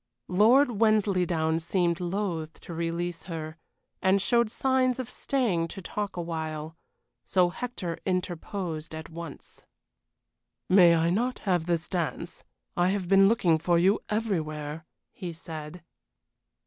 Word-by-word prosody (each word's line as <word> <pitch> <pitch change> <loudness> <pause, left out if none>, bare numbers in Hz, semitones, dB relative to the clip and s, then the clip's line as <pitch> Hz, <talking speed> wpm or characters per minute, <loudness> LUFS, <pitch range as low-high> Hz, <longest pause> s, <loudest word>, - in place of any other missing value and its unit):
Lord 225 +5 +4
Wensleydown 180 -7 +2
seemed 170 0 0
loath 175 -3 -3
to 170 - -8
release 170 +1 -3
her, 160 -2 -6 0.4
and 190 +1 +4
showed 235 +2 +2
signs 255 +1 +1
of 255 -2 -5
staying 215 -12 0
to 195 - -8
talk 205 +1 -4
awhile. 160 -2 -4 0.5
So 180 -2 +3
Hector 185 -5 -5
interposed 175 -3 -3
at 160 0 -8
once. 165 -3 -9 1.0
"May 180 -3 +7
I 165 +1 +2
not 245 +7 0
have 175 -4 +1
this 170 -1 0
dance? 175 -4 -3 0.3
I 175 +1 +3
have 190 -2 -1
been 195 +1 +6
looking 180 -7 +3
for 170 +1 +2
you 190 +5 +4
everywhere," 160 -8 -2 0.3
he 180 -4 -6
said. 160 0 -8
175 Hz, 125 wpm, -28 LUFS, 165-200 Hz, 1.0 s, May